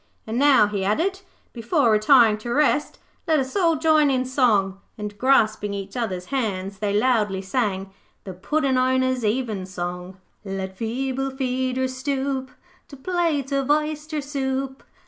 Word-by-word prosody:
And 225 Hz, +2 st, -2 dB
now,' 280 Hz, -6 st, +6 dB
he 205 Hz, -2 st, -3 dB
added, 335 Hz, -, 0 dB, 0.3 s
'before 240 Hz, +1 st, +1 dB
retiring 215 Hz, 0 st, +5 dB
to 235 Hz, +2 st, -6 dB
rest, 295 Hz, +2 st, +1 dB, 0.3 s
let 315 Hz, -2 st, +3 dB
us 260 Hz, -1 st, -4 dB
all 340 Hz, -5 st, +3 dB
join 310 Hz, -1 st, +3 dB
in 260 Hz, -1 st, +1 dB
song,' 215 Hz, -7 st, +1 dB, 0.2 s
and 210 Hz, -1 st, -6 dB
grasping 215 Hz, -5 st, +2 dB
each 195 Hz, 0 st, -7 dB
other's 190 Hz, -7 st, -3 dB
hands 200 Hz, -6 st, -2 dB
they 205 Hz, -1 st, -1 dB
loudly 210 Hz, -3 st, +1 dB
sang 195 Hz, -3 st, -2 dB, 0.3 s
THE 190 Hz, -, -7 dB
PUDDIN' 265 Hz, -, 0 dB
OWNERS' 260 Hz, -1 st, +1 dB
EVENSONG 185 Hz, -6 st, -3 dB, 0.3 s
'Let 190 Hz, -1 st, -5 dB
feeble 260 Hz, +5 st, -2 dB
feeders 260 Hz, 0 st, -2 dB
stoop 265 Hz, 0 st, -2 dB, 0.4 s
To 280 Hz, -, -12 dB
plates 315 Hz, -3 st, -1 dB
of 275 Hz, -1 st, -1 dB
oyster 305 Hz, 0 st, 0 dB
soup. 270 Hz, -1 st, -3 dB
255 Hz, 140 wpm, -23 LUFS, 205-275 Hz, 0.4 s, now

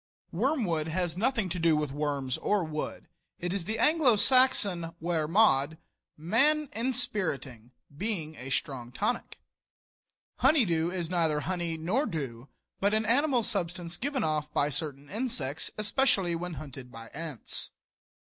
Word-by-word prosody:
Wormwood 190 Hz, -, 0 dB
has 175 Hz, 0 st, -1 dB
nothing 225 Hz, 0 st, +1 dB
to 180 Hz, -, -3 dB
do 165 Hz, -1 st, +4 dB
with 150 Hz, -2 st, -1 dB
worms 140 Hz, -3 st, -2 dB
or 205 Hz, -3 st, +1 dB
wood; 155 Hz, -1 st, -5 dB, 0.3 s
it 175 Hz, +1 st, -3 dB
is 195 Hz, -4 st, -3 dB
the 220 Hz, +3 st, -2 dB
Anglo 295 Hz, -1 st, +4 dB
Saxon 205 Hz, -9 st, +4 dB
"wer 160 Hz, -2 st, 0 dB
mod," 160 Hz, -5 st, +3 dB, 0.4 s
man 270 Hz, -, +2 dB
inspiriting, 205 Hz, -, -1 dB, 0.3 s
being 170 Hz, -4 st, -3 dB
a 130 Hz, -2 st, -8 dB
strong 130 Hz, -3 st, -2 dB
tonic. 185 Hz, -, -2 dB, 1.0 s
Honeydew 200 Hz, -, +3 dB
is 175 Hz, -2 st, -3 dB
neither 160 Hz, -4 st, +1 dB
honey 170 Hz, -1 st, -2 dB
nor 200 Hz, -, 0 dB
dew, 135 Hz, -5 st, -5 dB, 0.3 s
but 200 Hz, +2 st, +2 dB
an 220 Hz, 0 st, +1 dB
animal 250 Hz, +1 st, +3 dB
substance 175 Hz, -3 st, -2 dB
given 270 Hz, -, -2 dB
off 150 Hz, -1 st, -1 dB
by 145 Hz, 0 st, +1 dB
certain 145 Hz, -1 st, -2 dB
insects, 160 Hz, -, -1 dB
especially 205 Hz, -4 st, +2 dB
when 175 Hz, 0 st, -4 dB
hunted 135 Hz, -3 st, -8 dB
by 115 Hz, 0 st, -10 dB
ants. 155 Hz, -6 st, -4 dB
170 Hz, 135 wpm, -29 LUFS, 150-220 Hz, 1.0 s, do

